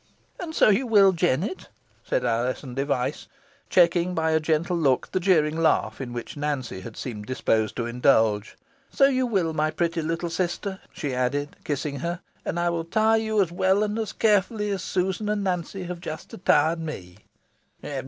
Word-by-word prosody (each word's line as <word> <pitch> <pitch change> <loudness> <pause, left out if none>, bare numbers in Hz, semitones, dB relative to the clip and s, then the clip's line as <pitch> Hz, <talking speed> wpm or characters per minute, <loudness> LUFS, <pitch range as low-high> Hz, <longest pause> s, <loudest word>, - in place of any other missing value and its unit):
"And 325 -3 -6
so - - +5
you 240 +6 +2
will, 200 -4 +6
Jennet," 175 - -1 0.3
said - - -1
Alizon 125 +3 -1
Device, 135 +1 -2 0.4
checking, 175 0 +3
by 160 0 +1
a 160 - +3
gentle 160 +3 0
look, 140 -6 +1
the 185 - 0
jeering 160 -5 +3
laugh 165 -3 +1
in 125 -2 -5
which 120 -1 -6
Nancy 140 -10 -3
seemed 105 -5 -6
disposed 110 -4 0
to 115 - -2
indulge 115 -3 +2 0.3
"so 275 - +4
you 260 -2 +2
will, 185 -8 0
my 155 0 +1
pretty 165 +1 -1
little 165 +2 -2
sister," 190 +2 -2
she 145 -5 -4
added, 140 +3 -1
kissing 140 -1 -3
her; 170 +2 -3 0.2
"and 170 - -2
I 175 0 +1
will 165 -1 -2
'tire 220 +5 +3
you 220 -2 +2
as 170 - -6
well 190 +3 +2
and 210 +1 -2
as 215 -3 -2
carefully 210 0 +1
as 195 -2 -2
Susan 190 +3 -1
and 210 -1 0
Nancy 185 0 -2
have 180 0 -6
just 160 -3 -7
'tired 160 +3 +4
me." 95 - -7
170 Hz, 175 wpm, -25 LUFS, 140-190 Hz, 0.4 s, will